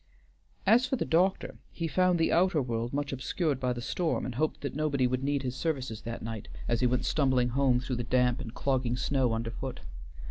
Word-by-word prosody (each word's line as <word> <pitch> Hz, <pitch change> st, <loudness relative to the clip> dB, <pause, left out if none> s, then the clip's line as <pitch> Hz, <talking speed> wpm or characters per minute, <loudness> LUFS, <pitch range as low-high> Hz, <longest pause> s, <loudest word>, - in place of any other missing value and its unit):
As 235 Hz, +6 st, +5 dB
for 265 Hz, -, 0 dB
the -, -, -2 dB
doctor, 180 Hz, +4 st, +1 dB
he 165 Hz, -, -3 dB
found 185 Hz, +2 st, +3 dB
the 165 Hz, -, +2 dB
outer 175 Hz, -2 st, +3 dB
world 120 Hz, -2 st, -2 dB
much 140 Hz, 0 st, -2 dB
obscured 140 Hz, +2 st, -1 dB
by 125 Hz, -1 st, 0 dB
the 120 Hz, -1 st, -4 dB
storm, 170 Hz, +4 st, -1 dB
and 125 Hz, -, -4 dB
hoped 155 Hz, +6 st, -1 dB
that 140 Hz, -, -4 dB
nobody 145 Hz, -3 st, +1 dB
would 130 Hz, +1 st, 0 dB
need 140 Hz, 0 st, 0 dB
his 125 Hz, -1 st, -3 dB
services 130 Hz, -8 st, -2 dB
that 115 Hz, 0 st, -6 dB
night, 110 Hz, -2 st, -5 dB, 0.2 s
as 120 Hz, -1 st, +1 dB
he 125 Hz, -, +4 dB
went 125 Hz, 0 st, 0 dB
stumbling 130 Hz, -4 st, +2 dB
home 130 Hz, 0 st, +2 dB
though 130 Hz, -, -2 dB
the 120 Hz, -1 st, -1 dB
damp 125 Hz, 0 st, +2 dB
and 115 Hz, -, -6 dB
clogging 130 Hz, -3 st, 0 dB
snow 130 Hz, -2 st, +1 dB
underfoot. 115 Hz, -, -4 dB
130 Hz, 210 wpm, -29 LUFS, 125-155 Hz, 0.2 s, As